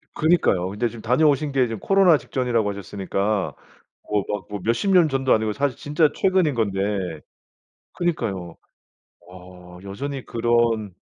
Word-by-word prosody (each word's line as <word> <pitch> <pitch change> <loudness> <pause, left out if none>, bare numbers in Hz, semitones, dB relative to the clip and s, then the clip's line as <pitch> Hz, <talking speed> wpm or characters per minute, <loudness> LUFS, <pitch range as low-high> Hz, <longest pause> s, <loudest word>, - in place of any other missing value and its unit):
그니까요. 150 - +2
근데 105 +5 -1
지금 115 -1 -10
다녀오신 145 +4 +2
게 130 -2 +2
지금 115 -2 -5
코로나 195 -5 +4
직전이라고 120 -6 -1
하셨으니까 100 -2 -2 0.5
뭐 105 -1 +1
막 105 -3 -3
뭐 105 0 -5
몇십 120 - 0
년 175 -4 +5
전도 135 -1 +1
아니고 110 -1 +1
사실 140 0 -1
진짜 150 +1 +1
최근인 185 -6 +2
건데. 100 -4 -1 1.1
그니까요. 100 - -3 0.7
어 90 -1 -13
여전히 135 +7 -5
그런 115 -3 +1
115 Hz, 315 characters per minute, -23 LUFS, 100-145 Hz, 1.1 s, 년